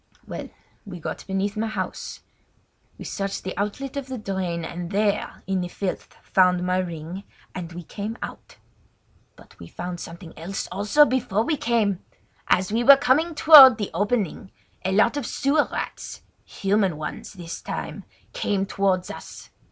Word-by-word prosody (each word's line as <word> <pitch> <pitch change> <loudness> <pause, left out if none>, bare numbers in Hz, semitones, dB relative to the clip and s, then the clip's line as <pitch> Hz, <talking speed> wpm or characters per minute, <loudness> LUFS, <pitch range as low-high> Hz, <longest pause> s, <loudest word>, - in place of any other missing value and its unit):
Well, - - -6 0.3
we 180 -5 -8
got - - -6
beneath 195 +2 -1
my 220 +1 -1
house. 215 - -5 0.8
We - - -9
searched 195 -1 -3
the 185 - -4
outlet 210 +8 -3
of 280 -2 -4
the 260 -1 -5
drain, 185 -5 -3
and 175 0 -6
there 205 +1 -1
in 190 -1 0
the 180 - -3
filth 185 +1 -5
found 180 -1 +3
my 185 0 +1
ring, 170 +1 -5 0.3
and 175 -2 -6
we 175 +1 -8
came 210 +6 -6
out. - - -9 0.8
"But - - -19
we 85 - -10
found 175 - -6
something 170 0 -9
else 175 +5 -5
also 210 +11 +4
before 225 -6 0
we 310 +6 0
came! 225 -8 +1 0.5
As 185 +2 +2
we 230 +2 +1
were 275 +2 +9
coming 305 +6 +2
toward 280 -6 +10
the 205 - -3
opening 205 +1 -1 0.3
a 190 - 0
lot 220 +7 +3
of 270 -6 -3
sewer 290 +2 +1
rats—human 195 -4 -3
ones 155 +6 -6
this 170 -4 -7
time—came 205 - -4
towards 190 -2 0
us. - - -10
195 Hz, 155 wpm, -24 LUFS, 180-230 Hz, 0.8 s, toward